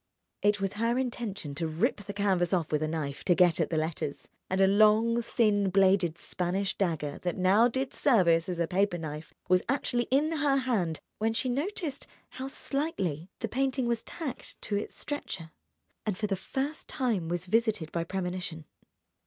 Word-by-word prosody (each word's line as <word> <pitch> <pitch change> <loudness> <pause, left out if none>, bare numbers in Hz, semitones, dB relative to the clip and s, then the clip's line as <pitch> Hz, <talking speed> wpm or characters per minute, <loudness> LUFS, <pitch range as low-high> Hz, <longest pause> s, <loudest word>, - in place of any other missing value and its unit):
It 205 0 +3
was 195 0 -1
her 230 +3 +1
intention 235 - -3
to 165 +3 -2
rip 160 +2 +1
the 205 0 -7
canvas 190 -4 +1
off 170 -4 0
with 150 -1 +1
a 155 - +1
knife, 150 -3 -3
to 175 - +4
get 175 -2 +4
at 165 - +1
the 160 - 0
letters; 155 -2 -3 0.2
and 185 - 0
a 195 - +7
long, 215 +4 +4
thin 210 -4 +2
bladed 190 -3 +3
Spanish 190 +3 -2
dagger 160 -6 -1
that 175 -1 -2
now 195 +5 +5
did 260 +2 -2
service 180 - +3
as 175 -2 -3
a 170 - +3
paper 190 +1 +1
knife 155 -1 -6 0.2
was 180 0 +4
actually 245 -3 +1
in 285 +5 +3
her 285 -2 +3
hand 215 - 0 0.2
when 220 +1 +1
she 255 - 0
noticed 290 +1 -2 0.2
how 260 +1 -6
slightly 200 - -2
the 225 - 0
painting 265 +2 0
was 235 -1 0
tacked 305 -7 -6
to 205 - -1
its 205 - -3
stretcher, 190 - -5 0.5
and 210 -4 -2
for 215 - -1
the 200 -2 0
first 275 - -4
time 225 - -1
was 175 0 -2
visited 215 -5 +1
by 170 - -1
premonition. 180 -3 -4
195 Hz, 180 wpm, -29 LUFS, 170-235 Hz, 0.5 s, a